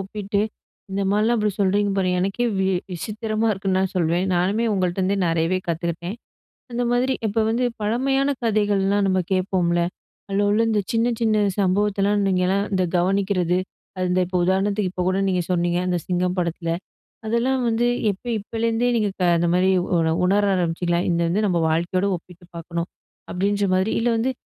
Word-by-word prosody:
ஒப்பிட்டு, 200 Hz, +1 st, -3 dB, 0.5 s
இந்த 195 Hz, +1 st, -1 dB
மாரிலாம் 220 Hz, +3 st, +2 dB
அப்டி 210 Hz, 0 st, +1 dB
சொல்றீங்க 200 Hz, +1 st, +2 dB
பாருங்க, 180 Hz, -1 st, +1 dB
எனக்கே 195 Hz, +6 st, 0 dB
வி 190 Hz, -, +1 dB, 0.3 s
விசித்திரமா 215 Hz, +5 st, -2 dB
இருக்குன்னு 190 Hz, -1 st, -1 dB
நான் 190 Hz, 0 st, -1 dB
சொல்வேன். 170 Hz, +1 st, +1 dB
நானுமே 195 Hz, +6 st, +1 dB
உங்கள்ட்டேந்தே 190 Hz, +1 st, 0 dB
நிறையவே 165 Hz, +2 st, +1 dB
கத்துக்கிட்டேன். 170 Hz, +4 st, -3 dB, 0.6 s
அந்த 245 Hz, +1 st, -1 dB
மாதிரி 255 Hz, +2 st, +2 dB
இப்போ 220 Hz, +2 st, 0 dB
வந்து, 240 Hz, +3 st, 0 dB, 0.2 s
பழமையான 270 Hz, +6 st, +1 dB
கதைகள்லாம் 205 Hz, -2 st, +2 dB
நம்ம 185 Hz, 0 st, +2 dB
கேட்போம்ல. 180 Hz, -2 st, +1 dB, 0.5 s
அதில 200 Hz, +1 st, +1 dB
உள்ள 215 Hz, +2 st, +3 dB
இந்த 210 Hz, -2 st, +2 dB
சின்ன 230 Hz, +1 st, +2 dB
சின்ன 215 Hz, -2 st, +2 dB
சம்பவத்தலாம் 200 Hz, +1 st, +1 dB
நீங்கள்லாம் 190 Hz, +2 st, +1 dB
இந்த 185 Hz, -1 st, +2 dB
கவனிக்கிறது. 185 Hz, -1 st, +1 dB, 0.4 s
அந்த 180 Hz, 0 st, 0 dB
இப்போ 180 Hz, +1 st, -2 dB
உதாரணத்துக்கு 195 Hz, +1 st, +1 dB
இப்போ 180 Hz, -1 st, -3 dB
கூட 185 Hz, +1 st, +1 dB
நீங்க 180 Hz, -1 st, +1 dB
சொன்னீங்க. 175 Hz, 0 st, +1 dB
அந்த 180 Hz, -1 st, +1 dB
சிங்கம் 180 Hz, 0 st, 0 dB
படத்தில. 170 Hz, -1 st, -2 dB, 0.6 s
அதெல்லாம் 245 Hz, +4 st, +1 dB
வந்து 230 Hz, +1 st, +1 dB, 0.2 s
எப்ப 195 Hz, -, -12 dB
இப்பலேருந்தே 230 Hz, +3 st, -1 dB
நீங்க 210 Hz, -3 st, +1 dB, 0.3 s
அந்த 170 Hz, +1 st, +1 dB
மாதிரி 185 Hz, +1 st, +3 dB, 0.3 s
உ -, -, +4 dB, 0.3 s
உணர 200 Hz, +3 st, +3 dB
ஆரம்பிச்சிங்களா? 175 Hz, 0 st, 0 dB
இது 175 Hz, -, +2 dB
இது 170 Hz, 0 st, +1 dB
வந்து 210 Hz, +5 st, +1 dB
நம்ம 175 Hz, -2 st, +1 dB
வாழ்க்கையோடு 175 Hz, +4 st, 0 dB
ஒப்பிட்டு 175 Hz, +1 st, -13 dB
பார்க்கணும், 170 Hz, +1 st, -4 dB, 0.4 s
அப்டின்ற 200 Hz, +2 st, 0 dB
மாதிரி, 190 Hz, +3 st, +1 dB
இல்ல 240 Hz, +1 st, +1 dB
வந்து 250 Hz, +4 st, 0 dB
195 Hz, 155 wpm, -22 LUFS, 180-215 Hz, 0.6 s, உ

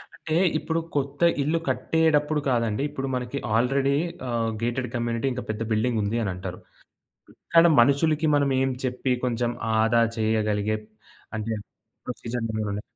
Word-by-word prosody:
అంటే 160 Hz, -1 st, -3 dB, 0.2 s
ఇప్పుడు 160 Hz, +1 st, -1 dB, 0.2 s
కొత్త 140 Hz, +2 st, -2 dB, 0.2 s
ఇల్లు 165 Hz, +3 st, +1 dB
కట్టేడప్పుడు 155 Hz, -2 st, +2 dB
కాదండి. 115 Hz, -2 st, +1 dB
ఇప్పుడు 135 Hz, 0 st, -4 dB
మనకి 125 Hz, +2 st, -3 dB, 0.2 s
"ఆల్రడీ 135 Hz, +4 st, +2 dB, 0.4 s
ఆహ్, 115 Hz, -1 st, 0 dB
గేటెడ్ 120 Hz, +1 st, -1 dB
కమ్యూనిటీ 120 Hz, +1 st, -1 dB
ఇంకా 125 Hz, -1 st, -5 dB
పెద్ద 110 Hz, +1 st, -3 dB
బిల్డింగ్ 110 Hz, +1 st, +1 dB
ఉంది." 110 Hz, +3 st, -1 dB
అని 100 Hz, -, -1 dB
అంటారు. 90 Hz, 0 st, -6 dB, 1.0 s
కానీ 165 Hz, +1 st, +8 dB
మనుషులకి 150 Hz, +5 st, +3 dB
మనంమేం 135 Hz, -2 st, +2 dB
చెప్పి 125 Hz, +1 st, 0 dB
కొంచెం 120 Hz, -1 st, 0 dB, 0.3 s
ఆదా 115 Hz, +1 st, +4 dB, 0.2 s
చేయగలిగే 110 Hz, -1 st, +1 dB, 0.6 s
అంటే 110 Hz, +1 st, -2 dB, 0.5 s
ప్రొసీజర్ 120 Hz, -1 st, -4 dB
ఉండవలే. 105 Hz, -1 st, -2 dB
125 Hz, 130 wpm, -25 LUFS, 110-140 Hz, 1.0 s, కానీ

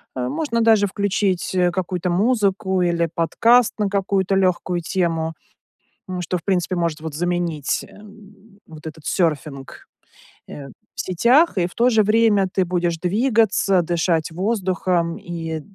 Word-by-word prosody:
э, 125 Hz, -1 st, -2 dB
можно 235 Hz, -, -1 dB
даже 220 Hz, -3 st, +4 dB
включить, 195 Hz, -2 st, -1 dB
э, 180 Hz, -1 st, +2 dB
какую-то 180 Hz, 0 st, -3 dB
музыку 195 Hz, -1 st, +1 dB
или 170 Hz, -1 st, +1 dB
подкаст 230 Hz, +9 st, +3 dB
на 205 Hz, -1 st, +1 dB
какую-то 195 Hz, -1 st, 0 dB
легкую 180 Hz, -2 st, 0 dB
тему. 165 Hz, -2 st, -1 dB, 0.8 s
М, 180 Hz, -1 st, -4 dB
что 180 Hz, +1 st, -2 dB
в 165 Hz, -, -11 dB
принципе, 185 Hz, -2 st, 0 dB
вот, 175 Hz, -, -1 dB
может 160 Hz, -2 st, -3 dB
заменить, 175 Hz, -3 st, -2 dB
эм, 210 Hz, 0 st, -17 dB
вот 160 Hz, 0 st, -11 dB
этот 155 Hz, 0 st, -10 dB
серфинг, 150 Hz, -6 st, -2 dB, 0.6 s
э, 140 Hz, -1 st, -9 dB
в 135 Hz, -, -10 dB
сетях. 235 Hz, -, +3 dB
И 175 Hz, -, +2 dB
в 175 Hz, -, -16 dB
то 240 Hz, +2 st, +3 dB
же 220 Hz, -3 st, +3 dB
время 215 Hz, -2 st, +3 dB
ты 190 Hz, 0 st, 0 dB
будешь 175 Hz, -1 st, -1 dB
двигаться, 205 Hz, -1 st, +2 dB
дышать 165 Hz, -1 st, 0 dB
воздухом. 185 Hz, -3 st, -1 dB
И, 165 Hz, -2 st, -5 dB
185 Hz, 145 wpm, -21 LUFS, 170-205 Hz, 0.8 s, даже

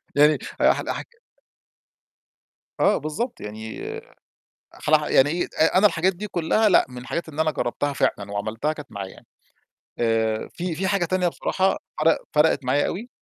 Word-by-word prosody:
يعني 150 Hz, +1 st, +5 dB, 0.2 s
هحل -, -, +3 dB
هاحك -, -, -4 dB, 1.7 s
آه، 205 Hz, -, +4 dB
بالضبط 185 Hz, -, -4 dB
يعني 110 Hz, +1 st, -7 dB, 0.9 s
أخلعها 150 Hz, 0 st, +1 dB
يعني 135 Hz, +2 st, +5 dB
إي 170 Hz, +3 st, 0 dB
أ 160 Hz, +3 st, +3 dB
أنا 210 Hz, +2 st, +7 dB
الحاجات 185 Hz, +1 st, +1 dB
دي 210 Hz, +4 st, -5 dB
كلّها 185 Hz, +5 st, +2 dB
لأ، 185 Hz, -, +5 dB
من 125 Hz, -, -10 dB
الحاجات 145 Hz, +7 st, -4 dB
اللي 155 Hz, +1 st, -2 dB
أنا 155 Hz, -, +2 dB
جرّبتها 140 Hz, +2 st, -2 dB
فعلًا 100 Hz, -6 st, -1 dB
وعملتها 110 Hz, +9 st, -2 dB
كانت 150 Hz, -6 st, -11 dB
معاه 100 Hz, -2 st, -5 dB
يعني، -, -, -15 dB, 0.7 s
آآ 115 Hz, -1 st, 0 dB
في 175 Hz, -1 st, -3 dB
في 190 Hz, +3 st, -1 dB
حاجة 195 Hz, -2 st, +1 dB
تانية 180 Hz, +1 st, +1 dB
بصراحة 190 Hz, +2 st, 0 dB, 0.3 s
فرق 165 Hz, 0 st, +5 dB, 0.2 s
فرقِت 150 Hz, -2 st, +3 dB
معايا 140 Hz, +3 st, +2 dB
أوي 225 Hz, +6 st, -5 dB
155 Hz, 160 wpm, -24 LUFS, 125-180 Hz, 1.7 s, أنا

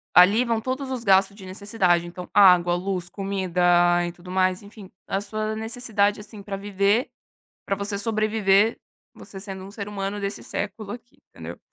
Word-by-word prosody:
Ali 200 Hz, +7 st, +7 dB
vão 230 Hz, -2 st, 0 dB
todos 260 Hz, +3 st, -4 dB
os 255 Hz, -3 st, -4 dB
gastos 195 Hz, -1 st, +4 dB
de 200 Hz, -2 st, -12 dB
necessidade, 185 Hz, -3 st, 0 dB
então 180 Hz, +1 st, -9 dB
água, 180 Hz, -3 st, +6 dB
luz, 180 Hz, -1 st, -3 dB
comida 175 Hz, -2 st, +2 dB
e 175 Hz, -, -4 dB
tudo 180 Hz, +1 st, -12 dB
mais, 185 Hz, +1 st, +1 dB
enfim, 205 Hz, -2 st, -13 dB, 0.2 s
a 195 Hz, -, -1 dB
sua 215 Hz, +1 st, -3 dB
necessidade, 220 Hz, -2 st, -1 dB
assim, 210 Hz, 0 st, -10 dB
para 195 Hz, 0 st, -5 dB
viver, 200 Hz, +4 st, +1 dB, 0.6 s
para 195 Hz, -, 0 dB
você 200 Hz, 0 st, -3 dB
sobreviver, 215 Hz, -1 st, +2 dB, 0.3 s
você 195 Hz, -, -11 dB
sendo 190 Hz, -1 st, -7 dB
um 195 Hz, -, -10 dB
ser 205 Hz, -1 st, -7 dB
humano 200 Hz, 0 st, -4 dB
desse 200 Hz, 0 st, -4 dB
século 205 Hz, 0 st, -5 dB
aqui, 240 Hz, +2 st, -12 dB
entendeu? -, -, -9 dB
200 Hz, 170 wpm, -24 LUFS, 185-215 Hz, 0.6 s, Ali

